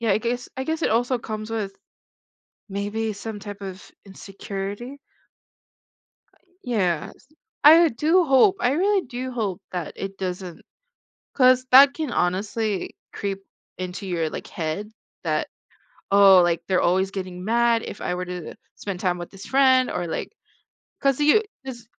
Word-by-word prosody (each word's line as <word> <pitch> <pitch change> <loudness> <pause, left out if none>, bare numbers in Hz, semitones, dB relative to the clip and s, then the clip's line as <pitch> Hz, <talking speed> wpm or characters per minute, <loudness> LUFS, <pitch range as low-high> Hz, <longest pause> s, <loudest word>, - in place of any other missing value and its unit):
Yeah, 230 -3 0
I 205 - +2
guess 245 +2 -3
I 265 - -2
guess 320 +2 -2
it - - +2
also 245 +2 +1
comes 215 -1 -6
with 210 -3 -3 1.0
maybe 205 +3 -2
some 210 +1 -7
type 205 0 -8
of 190 0 -8 0.2
insecurity. 200 +6 -7 1.3
Uh, - - -29 0.3
yes, 195 -1 -2 0.4
I 325 +3 +8
do 320 +8 +3
hope, 310 +8 +5
I 245 - +2
really 390 +6 +2
do 255 +1 -5
hope 210 -6 -3
that 175 -4 -4
it 195 0 -6
doesn't. 180 -2 -5 0.7
'Cause 255 -1 +4
that 275 +2 +9
can 310 -4 -4
honestly 200 +3 -1 0.2
creep 195 -1 -4 0.3
into 185 +2 -5
your, 165 -3 -1
like, - - -7
head 175 +6 -4 0.3
that, - - -1 0.6
"Oh, 195 -2 +8
like 170 -1 +1
they're 185 -2 +2
always 190 +2 +2
getting 185 -2 -6
mad 235 +1 +2
if - - -8
I 180 - -2
were 180 0 -4
to 180 -2 -7 0.2
spend 195 -3 -5
time 180 -1 0
with 175 -1 -7
this 195 +1 -11
friend," 260 -1 +4
or 175 - -3
like, 160 - -4 0.7
'cause 275 -1 +1
you 300 +9 +5 0.2
this 240 -4 -8
210 Hz, 155 wpm, -24 LUFS, 185-255 Hz, 1.3 s, that